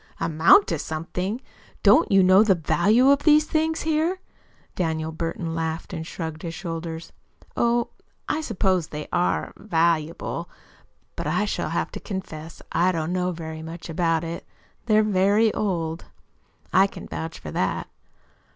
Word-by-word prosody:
"Amount 165 - +5
to - - -1
something! 180 +8 -3 0.4
Don't 330 - +5
you 195 -1 +6
know 185 +2 +7
the 200 -4 +4
value 220 - +3
of 280 0 +3
these 305 0 +5
things 320 +1 0
here?" 320 +4 0 0.6
Daniel 160 -2 -1
Burton 165 0 -3
laughed 160 +1 -3
and 160 -2 -5
shrugged 160 -3 -5
his 165 -1 -5
shoulders. 165 -2 -6 0.4
"Oh, 235 0 +1 0.4
I 315 - 0
suppose 185 - 0
they 150 -2 -6
are 90 -3 0
valuable. 165 -4 0 0.7
But - - -4
I - - +1
shall - - -2
have - - -2
to - - -6
confess 170 -5 -7
I 180 +2 +3
DON'T 165 -1 -2
know 180 0 0
very 160 -2 -6
much 165 +2 -8
about 165 -1 +1
it. 165 +1 -5 0.4
They're 215 -1 +5
very 205 +2 +3
old, 165 -5 -2 0.7
I 195 +1 +6
can - - -10
vouch 160 0 -5
for 75 - -8
that." - - -1
175 Hz, 150 wpm, -24 LUFS, 160-210 Hz, 0.7 s, know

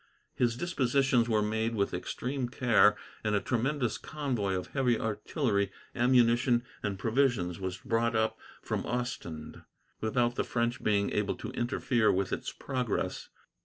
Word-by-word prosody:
His 120 -2 +1
dispositions 130 -6 +2
were 110 -2 +3
made 110 +2 0
with 100 -2 0
extreme 130 -1 -3
care, 110 -5 +4 0.3
and 105 -1 +1
a - - +3
tremendous 125 +1 -1
convoy 125 -11 -2
of 90 - -4
heavy 125 -4 +1
artillery, 105 - 0 0.2
ammunition, 120 0 +4 0.2
and 100 -2 -2
provisions 110 -6 +1
was 95 -1 -3
brought 115 0 0
up 110 0 +1 0.2
from - - -2
Ostend, 105 -11 -4 0.4
without 120 +2 +1
the - - +2
French 120 0 -1
being 100 -1 +2
able 105 -1 0
to - - -6
interfere 120 -1 +1
with 95 0 0
its - - -3
progress. 125 -5 -3
115 Hz, 140 wpm, -30 LUFS, 105-125 Hz, 0.4 s, care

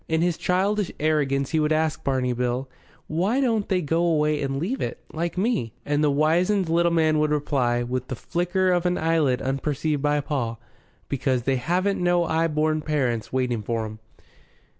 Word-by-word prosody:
In 160 +1 +1
his 175 -1 +1
childish 195 +3 0
arrogance 140 -3 +1
he 160 - +2
would 150 0 +1
ask 155 0 0
Barney 130 -2 0
Bill, 125 +2 -1 0.4
"Why 190 +11 0
don't 225 -6 +1
they 185 -3 +1
go 165 +3 +1
away 150 -3 +2
and 135 -1 -2
leave 195 - -2
it, - - -3
like 170 +2 -3
me?" 190 - 0
And 145 +1 +1
the 150 - +4
wizened 170 +6 +2
little 170 +1 +3
man 155 -2 +3
would 155 0 +2
reply, 135 -5 0
with 125 +1 -3
the 130 - -4
flicker 180 - 0
of 180 0 +2
an 180 - 0
eyelid 160 -6 +1
unperceived 145 +2 -1
by 145 0 +2
Paul, 120 -6 -3 0.5
"Because 130 -2 0
they 135 +1 +1
haven't 180 +10 0
no 175 -1 +2
'igh 165 0 +1
born 155 0 +1
parents 130 -8 -1
waiting 125 -3 0
for 115 +1 -2
'em. 110 0 -8
155 Hz, 180 wpm, -24 LUFS, 135-175 Hz, 0.5 s, the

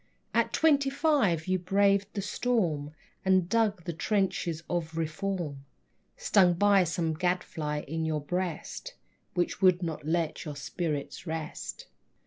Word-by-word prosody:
At - - +2
twenty 285 -4 +3
five 270 - +2
you 185 0 +1
braved 195 +2 +3
the 200 - -2
storm 175 -10 0 0.3
And 185 -2 +3
dug 210 -3 +1
the 170 - -4
trenches 180 -3 0
of 165 -2 -2
Reform, 160 -3 -3 0.5
Stung 180 -3 +4
by 200 0 +5
some 165 0 -1
gadfly 155 -3 -1
in 160 +3 -3
your 155 -1 -1
breast 180 - -4 0.4
Which 175 +1 0
would 185 -1 +5
not 160 -3 -3
let 165 +1 -1
your 150 -3 -6
spirit 150 +3 -4
rest. 160 - -5
175 Hz, 130 wpm, -29 LUFS, 160-200 Hz, 0.5 s, by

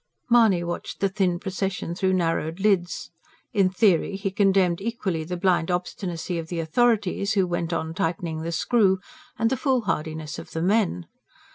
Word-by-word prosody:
Mahony 220 -7 +5
watched 175 0 -5
the 195 - +2
thin 190 -3 +1
procession 190 -2 -3
through 185 +1 0
narrowed 165 -1 0
lids. 190 -4 0 0.4
In 195 -4 +3
theory 190 -1 +2
he 195 0 -2
condemned 190 -3 +2
equally 200 -7 -2
the 180 +3 -4
blind 175 -2 +2
obstinacy 180 -1 -3
of 165 - -6
the 170 0 -4
authorities, 200 +2 +1
who 195 -3 +3
went 175 -1 -2
on 160 -1 -2
tightening 165 -1 -2
the 165 +1 -3
screw, 190 +3 +3 0.4
and 225 0 +1
the 265 - +1
foolhardiness 160 - -1
of - - -11
the 160 - -2
men. 190 -3 +1
185 Hz, 160 wpm, -25 LUFS, 170-200 Hz, 0.4 s, Mahony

